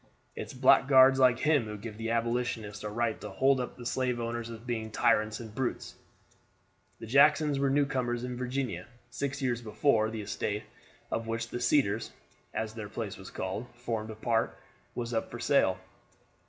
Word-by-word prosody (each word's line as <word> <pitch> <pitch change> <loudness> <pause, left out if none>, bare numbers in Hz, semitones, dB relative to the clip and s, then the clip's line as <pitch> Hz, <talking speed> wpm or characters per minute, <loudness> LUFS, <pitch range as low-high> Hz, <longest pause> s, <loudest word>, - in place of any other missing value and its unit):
It's - - -6
blackguards 130 0 +6
like 125 -2 +5
him 145 -2 +2
who 105 0 -6
give 105 +1 -8
the 115 0 -2
Abolitionists 115 -3 -1
a 105 - -3
right 115 +1 -1
to - - -6
hold 135 0 +3
up 125 - -4
the 120 - -9
slave 125 -1 0
owners 115 0 -3
as 115 - -6
being 115 -1 -4
tyrants 110 -1 +2
and 110 -3 -9
brutes." 130 0 -3 1.1
The - - -7
Jacksons 145 +3 +4
were 140 0 +2
newcomers 130 -4 0
in 125 0 -4
Virginia. 125 -7 -3 0.2
Six 140 +2 -3
years 120 -2 0
before, 110 0 +2
the 110 -1 -5
estate, 105 +1 -3 0.5
of 115 0 -2
which 115 0 -2
the 120 - -4
Cedars, 115 -5 +2 0.4
as 110 -1 -3
their 110 -2 -7
place 110 -2 -4
was 95 - -10
called, 95 +6 -4
formed 115 -3 -3
a 110 - -6
part, 115 +1 0 0.4
was 120 -1 -3
put 115 - 0
up - - -10
for 120 - -7
sale. 120 -7 +3
120 Hz, 180 wpm, -30 LUFS, 110-130 Hz, 1.1 s, blackguards